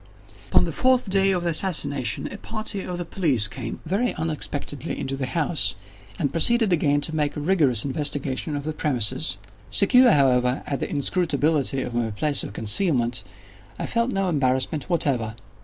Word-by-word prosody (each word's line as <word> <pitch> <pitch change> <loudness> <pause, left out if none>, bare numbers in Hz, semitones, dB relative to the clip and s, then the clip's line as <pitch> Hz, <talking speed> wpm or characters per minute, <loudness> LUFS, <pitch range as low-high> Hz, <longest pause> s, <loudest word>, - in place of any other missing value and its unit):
Upon - - +5
the - - -3
fourth 255 -5 +1
day 195 0 +3
of 180 -2 0
the 170 - +1
assassination, 145 - 0
a 200 - -8
party 215 -2 -4
of 180 -1 -5
the 175 - -4
police 145 - +2
came, 115 +5 -7
very 200 +9 0
unexpectedly, 145 -3 -4
into 135 - -3
the 135 -1 -3
house, 150 - -1 0.4
and 140 - -1
proceeded 225 +4 +2
again 145 -3 +2
to 155 +2 -4
make 150 -2 0
rigorous 150 - +2
investigation 145 +1 -2
of 145 - -4
the 155 +1 -3
premises. 120 - 0 0.3
Secure, 245 - +5
however, 125 -3 +3
in 140 -3 -2
the - - -3
inscrutability 145 -3 0
of 125 - -6
my 120 -1 0
place 140 +7 0
of - - -6
concealment, 120 - +1 0.5
I - - -3
felt 235 +1 0
no 195 -5 -1
embarrassment 135 -1 0
whatever. 125 -10 +1
145 Hz, 165 wpm, -24 LUFS, 130-180 Hz, 0.5 s, Upon